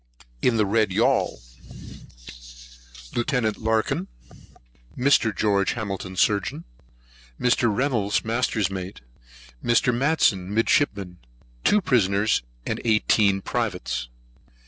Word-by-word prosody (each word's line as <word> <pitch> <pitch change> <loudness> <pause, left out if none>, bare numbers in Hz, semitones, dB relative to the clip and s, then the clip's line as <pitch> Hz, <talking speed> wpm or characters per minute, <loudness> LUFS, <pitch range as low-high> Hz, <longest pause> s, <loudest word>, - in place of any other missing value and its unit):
In 120 -2 +2
the 105 - +3
Red 110 +2 +2
Yaul: - - +1 1.8
Lieut. 120 -4 0
Larkan, 110 -4 0 0.9
Mr. 125 -5 +3
Geo. 100 -2 +2
Hamilton, 95 -4 -4
Surgeon, 100 -3 0 0.8
Mr. 120 -2 +2
Reynolds, 110 -4 0
Master's 110 -3 0
Mate, 95 0 -6 0.6
Mr. 120 +1 +2
Matson, 120 - +1
Midshipman, 105 - 0 0.4
Two 210 - +3
Prisoners, 105 - +2 0.2
Eighteen 105 -3 +2
Privates. 60 -1 -3
110 Hz, 85 wpm, -24 LUFS, 100-120 Hz, 1.8 s, the